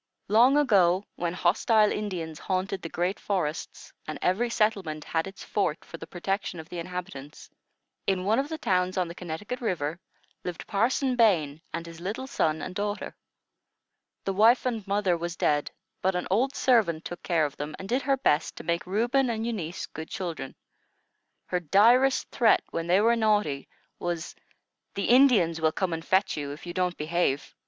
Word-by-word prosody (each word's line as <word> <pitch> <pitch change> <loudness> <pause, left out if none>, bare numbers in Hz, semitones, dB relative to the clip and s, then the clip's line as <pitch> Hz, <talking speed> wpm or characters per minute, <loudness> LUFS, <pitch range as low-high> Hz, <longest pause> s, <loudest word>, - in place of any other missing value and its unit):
Long 240 +7 +6
ago, 195 -9 +4
when 175 0 -2
hostile 215 +3 +3
Indians 175 -7 -4
haunted 190 0 -2
the 165 - -6
great 180 +5 -1
forests, 170 -6 -3
and 155 - -4
every 220 +7 +1
settlement 195 -9 0
had 160 +2 -1
its 195 -1 -10
fort 195 -6 -1
for 165 - -9
the - - -9
protection 195 0 -3
of 160 - -9
the 175 - -5
inhabitants, 175 -5 -7 0.6
in 185 -1 +1
one 220 +4 +3
of 280 +2 -2
the 320 - -4
towns 185 -7 0
on 180 -2 +1
the 170 - -7
Connecticut 180 - -6
River, 170 -7 -2 0.4
lived 175 -2 -5
Parson 250 +5 +1
Bain 165 -11 +3
and 165 0 -4
his 165 0 -11
little 210 +8 -4
son 160 -11 0
and 185 - -5
daughter. 205 +1 -3 1.1
The 195 - 0
wife 225 +7 +5
and 225 -5 -2
mother 200 -3 +2
was 170 +1 -4
dead; 145 -4 +1 0.3
but 190 0 +1
an 180 - -1
old 260 +8 +2
servant 210 -11 +2
took 175 - -6
care 165 -4 +1
of 145 -1 -5
them, 150 +1 -5
and 190 - -8
did 250 +6 +1
her 275 0 +1
best 155 - +1
to - - -8
make 170 +2 -1
Reuben 240 +7 +1
and 225 -1 -2
Eunice 190 -8 -3
good 160 +1 -8
children. 165 -7 -5 0.9
Her 180 - -1
direst 230 - +4
threat, 230 -3 +4
when 165 0 -3
they 185 +3 +4
were 230 +2 +4
naughty, 210 - +1 0.3
was, 175 -1 -3 0.6
"The 200 - -1
Indians 225 -11 +5
will 160 0 +3
come 180 +1 -1
and 165 0 -4
fetch 190 +2 +2
you, 145 -1 -3
if 150 - -11
you 175 - -6
don't 180 -1 -1
behave." 155 -3 -1
185 Hz, 180 wpm, -27 LUFS, 165-220 Hz, 1.1 s, Long